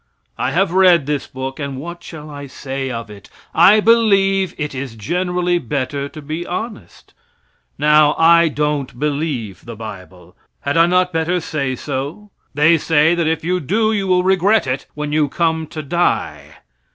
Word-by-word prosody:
I - - -1
have 190 0 +1
read 180 -5 +5
this 145 -1 -2
book 130 +1 -6
and 140 -2 -4
what 170 +5 -7
shall 155 -2 -10
I 145 -1 -8
say 135 0 -5
of 115 -3 -6
it? 100 -2 -13 0.2
I 210 +3 +6
believe 195 -4 +3
it 150 -1 -4
is 130 -3 -6
generally 180 - -1
better 140 0 -3
to 155 - -10
be 155 +4 -4
honest. 210 +6 -7 0.6
Now, 150 0 +4
I 170 +1 +5
don't 150 -4 -2
believe 140 - -3
the 115 -1 -8
bible. 90 -5 -10 0.3
Had 140 +1 -2
I 165 +1 +5
not 180 0 +2
better 165 +2 0
say 140 -5 -3
so? 145 +11 -5 0.2
They 155 +3 +4
say 160 +2 +3
that 170 -2 0
if 160 0 -1
you 180 +2 0
do 215 - +1
you 200 -2 -1
will 180 -1 +3
regret 190 +2 +3
it 130 +1 -3
when 150 0 -4
you 150 -1 +1
come 160 -1 -1
to 155 0 -7
die. 170 +5 -1
155 Hz, 170 wpm, -18 LUFS, 140-180 Hz, 0.6 s, I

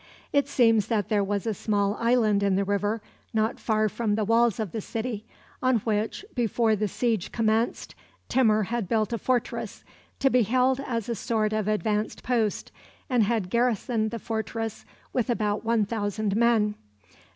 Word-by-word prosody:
It 285 -1 +3
seems 225 -6 +3
that 215 -5 0
there 205 -2 +2
was 200 +1 -2
a 225 - 0
small 205 0 0
island 230 -4 +3
in 200 -1 +2
the 200 - +2
river, 205 +2 -1 0.3
not 220 +2 +1
far 215 -1 +1
from 215 0 -1
the 215 -1 0
walls 230 +1 +3
of 215 -6 -2
the 220 - -3
city, 225 0 -4 0.3
on 255 -1 +3
which, 220 - -2
before 230 -2 +1
the 210 +1 -1
siege 225 -3 -1
commenced, 225 +1 0 0.3
Timur 220 -4 +3
had 225 -1 -3
built 220 0 +1
a 230 - -1
fortress, 250 +1 -2 0.3
to 270 -1 +2
be 250 - +4
held 255 +4 +2
as 235 -6 -3
a 235 - -1
sort 215 -1 -1
of 215 -1 -1
advanced 215 0 -1
post, 230 -5 0 0.4
and 245 -2 +4
had 210 -4 -1
garrisoned 235 -1 +1
the 230 - -4
fortress 225 0 -4 0.3
with 250 -1 0
about 215 -3 0
one 225 -2 +2
thousand 205 -1 -2
men. 225 -2 +3
220 Hz, 170 wpm, -26 LUFS, 210-235 Hz, 0.4 s, be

